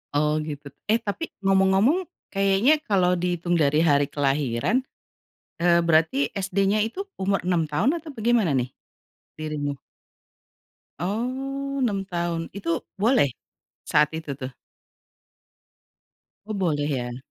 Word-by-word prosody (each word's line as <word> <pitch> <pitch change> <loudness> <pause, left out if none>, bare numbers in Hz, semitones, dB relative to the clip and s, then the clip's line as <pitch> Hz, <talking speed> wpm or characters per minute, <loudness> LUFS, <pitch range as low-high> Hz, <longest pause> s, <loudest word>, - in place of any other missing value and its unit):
Oh, 150 +1 +2
gitu. 145 -2 -6 0.2
Eh 225 +2 +3
tapi 215 +11 -3 0.2
ngomong-ngomong 195 - +3 0.2
kayaknya 195 +10 +3
kalau 180 -3 +3
dihitung 175 -1 0
dari 150 +2 +3
hari 145 -3 +3
kelahiran, 140 - +1 0.8
eee, 170 0 +5
berarti 160 -4 +3
SD-nya 195 +2 +1
itu 370 - -5
umur 195 0 0
6 175 -3 +2
tahun 190 - +1
atau 315 -2 -8
bagaimana 225 - +2
nih, 130 -2 +1 0.7
dirimu? 145 -2 -3 1.2
Oh, 265 +8 -3
6 215 -7 0
tahun, 170 -1 -2
itu 165 -4 -1 0.2
boleh 220 - +3 0.6
saat 150 0 +3
itu 155 -3 -5
tuh? 130 -2 -5 2.0
Oh, 215 - -4
boleh 165 -7 0
ya? 120 -4 -3
180 Hz, 115 wpm, -25 LUFS, 150-215 Hz, 2.0 s, eee